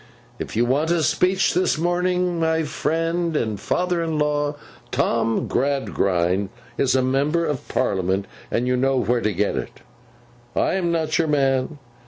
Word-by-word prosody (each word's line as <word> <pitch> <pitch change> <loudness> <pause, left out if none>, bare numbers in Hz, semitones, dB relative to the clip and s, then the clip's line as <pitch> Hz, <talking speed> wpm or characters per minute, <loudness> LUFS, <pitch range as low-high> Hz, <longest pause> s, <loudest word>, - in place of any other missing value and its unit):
If - - -5
you 120 +2 +3
want 145 +6 +1
a 170 -2 +2
speech 185 +4 +2
this 180 -2 +2
morning, 180 +1 0
my 160 0 +1
friend 165 +2 -1
and 110 -6 -2
father 180 -1 0
in 160 -2 -1
law, 150 0 0 0.3
Tom 115 -1 +1
Gradgrind, 100 -9 0 0.3
is 130 -1 +2
a 130 - +3
Member 145 +6 +1
of 145 -5 -3
Parliament, 95 -4 0 0.2
and 120 - 0
you 125 - +2
know 135 +2 +2
where 120 -1 +1
to 110 - +1
get 100 -4 0
it. 65 -2 -6 0.7
I - - +2
am 180 -3 0
not 160 -1 0
your 165 - +2
man. 135 -1 +1
145 Hz, 160 wpm, -22 LUFS, 120-165 Hz, 0.7 s, you